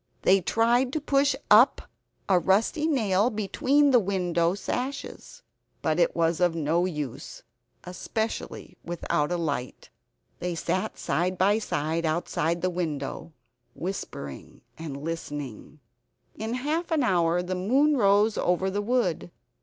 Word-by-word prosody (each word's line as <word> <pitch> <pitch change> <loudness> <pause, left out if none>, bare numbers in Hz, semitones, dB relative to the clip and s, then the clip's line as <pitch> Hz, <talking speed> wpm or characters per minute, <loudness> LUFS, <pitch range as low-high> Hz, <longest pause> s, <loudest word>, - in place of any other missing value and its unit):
They 195 +1 +5
tried 240 +6 +2
to 310 - 0
push 280 -1 +2 0.2
up - - +6 0.4
a 185 -2 +4
rusty 220 - +1
nail 220 -7 +2
between 255 +7 +2
the 250 - +6
window 180 -3 0
sashes; 275 - -5 0.4
but 160 +1 +1
it 170 - +2
was 165 0 +1
of 175 -2 +2
no 165 +2 +1
use, 150 -5 -6 0.4
especially 220 +5 -5
without 170 -2 -1
a 175 - 0
light. 145 -7 -4 0.5
They 175 -1 -3
sat 185 +3 -2
side 180 +2 -1
by 200 +4 +3
side 160 -5 -2
outside 170 +1 -1
the 185 - +1
window, 165 -2 -4 0.4
whispering 165 - -6
and 155 -4 -7
listening. 145 -4 -6 0.6
In 220 +2 -3
half 305 +7 -2
an 315 -4 +1
hour 175 -5 +2
the 180 +1 -3
moon 265 +12 +2
rose 205 -2 +3
over 185 +2 +1
the 205 +2 -1
wood. 205 -7 0
185 Hz, 130 wpm, -26 LUFS, 165-225 Hz, 0.6 s, up